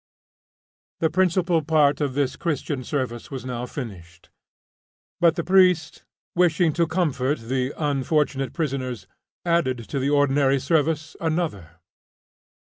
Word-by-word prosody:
The 160 -1 +1
principal 175 -1 +2
part 150 -2 +2
of 140 -3 -1
this 140 -2 0
Christian 145 -4 -2
service 125 -4 -3
was 130 -3 -6
now 125 -1 -4
finished, 90 - -9 0.9
but 170 -1 +4
the 170 - -2
priest, 180 -4 +3 0.3
wishing 175 -2 +3
to 170 +1 +1
comfort 155 -5 0
the 125 +3 -2
unfortunate 145 -2 0
prisoners, 130 -6 -3 0.4
added 170 -7 +1
to 140 - -2
the 135 +1 0
ordinary 140 -1 +3
service 160 +1 0
another. 155 - -2
145 Hz, 120 wpm, -24 LUFS, 130-165 Hz, 0.9 s, but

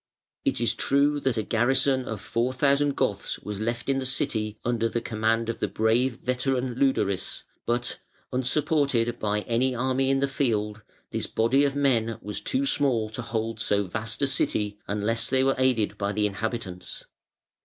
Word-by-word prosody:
It - - +1
is 120 - +2
true 145 +2 +2
that 130 -4 0
a 110 - +1
garrison 130 +4 +2
of 110 -3 -4
four 120 +3 -1
thousand 140 +1 +2
Goths 100 -1 -1
was 105 -1 -6
left 120 +2 -2
in 135 -1 +2
the 130 - -3
city 110 -4 -1
under 115 -1 +1
the 120 - -1
command 115 0 0
of 115 - -3
the - - 0
brave 115 +4 +2
veteran 125 0 0
Leudaris, 120 -7 0 0.2
but, 120 +1 -1 0.3
unsupported 130 -2 +1
by 105 0 0
any 125 +3 0
army 130 +2 +1
in 135 - +3
the 140 - +2
field, 110 -6 -1 0.3
this - - -2
body 130 +6 +3
of 140 -1 0
men 115 -6 +2
was 105 -1 -5
too 265 +1 0
small 125 - +2
to 110 - -4
hold 115 -1 -3
so 105 -2 +1
vast 115 +7 -4
a - - +6
city 105 -6 0
unless 105 +3 -1
they 130 0 +3
were 135 0 +3
aided 125 -5 +1
by 100 0 0
the 105 0 +1
inhabitants. 100 -3 -4
120 Hz, 175 wpm, -26 LUFS, 110-135 Hz, 0.3 s, a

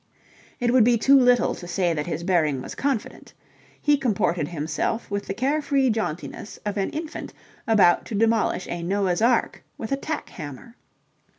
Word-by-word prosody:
It 240 0 +1
would 255 -3 +6
be 240 +1 +4
too 270 +5 +3
little 250 -2 +4
to 175 - -9
say 175 -1 0
that 150 0 -3
his 165 0 -3
bearing 160 -7 +1
was 125 - -7
confident: 270 -6 -3 0.5
he 295 0 +3
comported 195 - 0
himself 170 +8 -3
with 200 0 -3
the - - -2
care 280 +6 0
free 275 -3 +2
jauntiness 210 -1 -4
of 205 -1 -2
an 195 -2 -1
infant 315 +1 -6 0.3
about 205 -6 +4
to 220 - -4
demolish 220 -3 +1
a 175 - -4
Noah's 185 +1 0
Ark 235 0 +1
with 220 - -6
a 275 - +1
tack 310 +2 -4
hammer. 145 - -9
215 Hz, 175 wpm, -24 LUFS, 175-250 Hz, 0.5 s, would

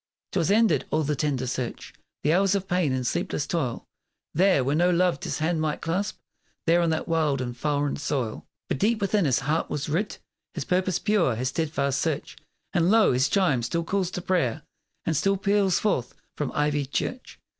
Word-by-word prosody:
'Twas 165 - +1
ended 220 +2 +3
all 155 0 +1
the 150 0 0
tender 135 -3 -1
search; 125 -1 -4 0.3
The 150 - +3
hours 195 +2 +3
of 195 -1 -2
pain 180 -5 +1
and 130 -1 -1
sleepless 145 - -1
toil; 140 -9 -2 0.5
There, 180 -4 +4
where 140 +3 +1
no 175 +3 +3
loved 180 0 +1
his - - -2
hand 160 +1 0
might 155 -1 -1
clasp; 185 +5 -2 0.5
There, 170 +1 +4
on 170 - +2
that 160 0 -1
wild 155 -4 +1
and 120 -1 -4
foreign 145 +2 -1
soil. 130 -6 -3 0.2
But - - -2
deep 220 +2 +2
within 200 -1 +1
his 130 -5 +2
heart 150 +5 0
was 150 0 -3
writ 185 +8 -1 0.4
His - - -3
purpose 185 -1 +1
pure; 205 - +2
his 125 +3 -1
steadfast 140 -3 -1
search. 160 -4 -2 0.4
And 175 -1 +3
lo! 220 - +5
his 130 +2 +2
chime 165 -10 +2
still 170 +8 -1
calls 190 +1 -1
to 180 - -5
prayer, 170 -12 0 0.4
And 165 - 0
still 195 +6 +2
peals 200 -1 +2
forth 135 - -1 0.2
from 150 -3 -2
ivied 150 -2 0
church. 255 - -3
160 Hz, 190 wpm, -26 LUFS, 140-185 Hz, 0.5 s, lo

